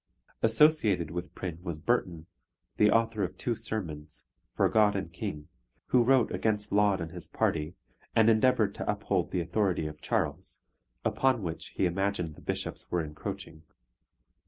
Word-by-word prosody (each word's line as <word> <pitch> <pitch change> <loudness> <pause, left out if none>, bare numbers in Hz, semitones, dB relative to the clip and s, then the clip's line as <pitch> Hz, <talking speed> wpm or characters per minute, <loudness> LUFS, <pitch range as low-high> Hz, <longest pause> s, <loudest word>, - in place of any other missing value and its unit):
Associated 110 - +4
with 90 +1 -6
Prynne 85 -3 -5
was 85 -4 -5
Burton, 85 -5 0 0.5
the 105 - +5
author 115 0 +2
of 90 - -4
two 120 - -1
sermons 85 - -5 0.3
For - - +3
God 105 -2 +3
and - - -4
King, 75 0 -5 0.4
who 125 - +5
wrote 130 -1 +4
against 105 -1 -1
Laud 100 -2 +3
and 80 0 -5
his 90 -1 -5
party, 80 +2 -1 0.4
and 110 -1 +5
endeavoured 110 -2 +4
to - - -1
uphold 100 -4 -1
the 90 - -1
authority 90 -1 0
of 75 -1 -7
Charles, 95 -6 -2 0.4
upon 130 -5 +2
which 85 -2 -4
he - - +2
imagined 90 -2 -1
the - - -15
bishops - - -3
were 85 -2 +1
encroaching. 75 +1 -7
95 Hz, 155 wpm, -29 LUFS, 85-110 Hz, 0.5 s, the